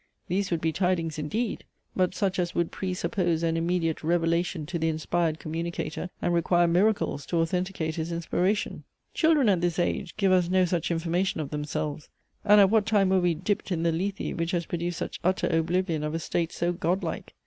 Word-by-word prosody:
These 190 +2 0
would 170 -2 -1
be 160 - +1
tidings 165 -2 0
indeed; 210 +10 -2 0.3
but 185 -1 +1
such 190 -2 0
as 175 -1 -1
would 170 -1 0
pre 185 -2 -3
suppose 170 -2 0
an 165 -1 +1
immediate 165 -1 0
revelation 170 0 0
to 170 +2 -3
the 160 0 +1
inspired 160 0 0
communicator, 165 +1 -4
and 175 - +1
require 175 +1 +3
miracles 180 -4 +1
to 170 - -1
authenticate 165 -1 -1
his 160 +1 -3
inspiration. 180 +5 -1 0.3
Children 315 -6 +3
at 190 -4 +3
this 175 -1 0
age 175 - -1
give 195 -3 +3
us 180 -2 +3
no 185 0 +4
such 175 -1 -1
information 170 +2 0
of 145 -3 -4
themselves; 150 0 -3 0.3
and 210 0 +6
at 195 -1 +6
what 220 -2 +3
time 205 -4 +3
were 190 -1 +3
we 175 -2 +2
dipped 195 +4 -2
in 165 -2 0
the 170 - +3
Lethe, 190 +5 -2
which 165 +1 -1
has 170 -1 0
produced 175 +1 -3
such - - -5
utter 185 +2 +1
oblivion 165 -1 0
of 150 +1 -2
a - - -1
state 165 +1 -1
so 175 +1 -1
godlike? 175 0 -2
175 Hz, 195 wpm, -27 LUFS, 165-185 Hz, 0.3 s, and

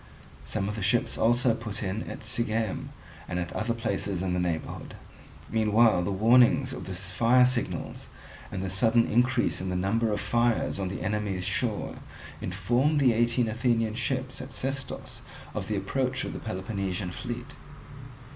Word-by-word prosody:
Some 95 - -2
of 105 - -2
the 110 - -4
ships 110 +5 +2
also 120 +1 +3
put 110 -2 -4
in 100 +3 -3
at - - -7
Sigeum 110 -3 -1 0.4
and 90 - -3
at 90 -1 -2
other 115 +2 -1
places 100 -4 -2
in 90 -1 0
the 90 - 0
neighbourhood. 85 -3 -3 0.5
Meanwhile 110 -2 +4
the 90 - -1
warnings 125 +6 +4
of - - -6
the 95 - -5
fire 115 +7 +4
signals 125 -1 -2 0.4
and 95 - -3
the 95 - -2
sudden 115 +5 +4
increase 125 0 +2
in 95 - -3
the 90 - -2
number 105 +5 +1
of 105 - 0
fires 120 -3 +1
on 95 - -1
the 90 -1 -4
enemy's 100 -2 -1
shore - - -1 0.4
informed 120 - +1
the 130 -4 +5
eighteen 120 +1 +2
Athenian 115 -1 +1
ships 130 +2 -2
at 130 0 -9
Sestos 135 +1 -4 0.3
of - - -4
the - - -1
approach 130 -1 -1
of - - -4
the - - -5
Peloponnesian 95 -2 -3
fleet. 120 +6 -5
110 Hz, 165 wpm, -28 LUFS, 95-120 Hz, 0.5 s, the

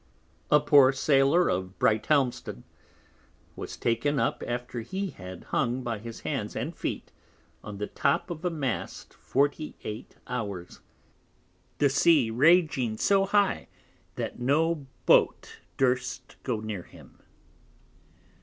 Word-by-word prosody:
A 150 - +6
poor 145 -2 +6
Sailor 140 +5 +3
of 95 +1 -2
Brighthelmston 120 - +1 0.9
was - - -7
taken 135 +5 0
up - - 0
after 120 0 -4
he 190 - -4
had 90 -1 -10
hung 125 0 -1
by 115 -3 -3
his 115 +1 -9
Hands - - -3
and - - -3
Feet - - -4 0.5
on 105 -1 -7
the 105 - -2
top 140 - 0
of 165 0 -6
a 180 - +1
Mast 140 -8 -4
48 140 -5 -2
hours, 100 -8 -5 1.0
the 145 - +4
Sea 145 -4 +4
raging 135 -4 +3
so 195 - +3
high, 205 0 +2 0.5
that - - -4
no 150 +3 +1 0.2
Boat - - +3 0.2
durst 125 -1 -1
go 115 -5 -2
near 110 -4 -4
him. - - -17
130 Hz, 120 wpm, -27 LUFS, 115-150 Hz, 1.0 s, A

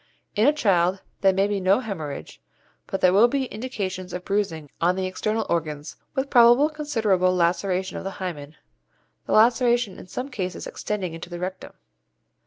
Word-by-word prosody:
In 215 +1 +3
the 290 - +7
child 190 - +2 0.2
there 195 - +5
may 195 +1 +2
be 205 -1 -1
no 190 +4 +3
hæmorrhage, 175 - -6 0.5
but 195 - -3
there 180 0 +5
will 210 +5 +6
be 270 +2 -1
indications 195 -7 -5
of 180 0 -5
bruising 180 -7 -1
on 175 +2 +3
the 190 0 -2
external 215 +4 -1
organs, 155 -3 -3 0.2
with 270 +1 -2
probably 245 +5 +6
considerable 220 -12 +1
laceration 180 +2 0
of - - -6
the 195 0 -6
hymen, 155 -6 -6 0.7
the - - -1
laceration 235 -2 +3
in - - -11
some 255 +8 -5
cases 190 -8 -4
extending 190 -5 -4
into 165 +1 -8
the 175 - -6
rectum. 185 +2 -6
195 Hz, 170 wpm, -24 LUFS, 180-230 Hz, 0.7 s, the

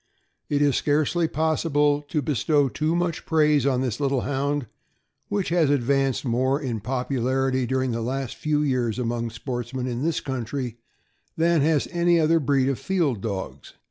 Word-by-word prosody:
It 145 0 +2
is 145 -2 +3
scarcely 155 +3 +1
possible 150 -2 +1
.to 145 0 -3
bestow 145 +1 +2
too 155 +5 -1
much 175 -1 -1
praise 150 -4 +3
on 130 -2 +1
this 125 -2 -2
little 135 -3 +1
Hound, 140 0 -1 0.6
which 205 -2 -1
has 165 -4 +3
advanced 135 0 +1
more 130 +3 +1
in 125 -7 -3
popularity 130 +2 -1
dur 130 +1 0
ing 130 - -1
the 115 0 -2
last 130 +1 -3
few 150 -1 0
years 125 -6 0
among 120 -1 -2
sportsmen 120 +2 -4
in 125 -1 -3
this 165 +1 0
country 125 -2 -4 0.6
than 165 -1 +3
has 150 0 +2
any 175 -1 +3
other 165 +1 +3
breed 135 -2 +2
of 135 -2 -1
field 160 - 0
dogs. 95 - -5
135 Hz, 165 wpm, -24 LUFS, 125-150 Hz, 0.6 s, is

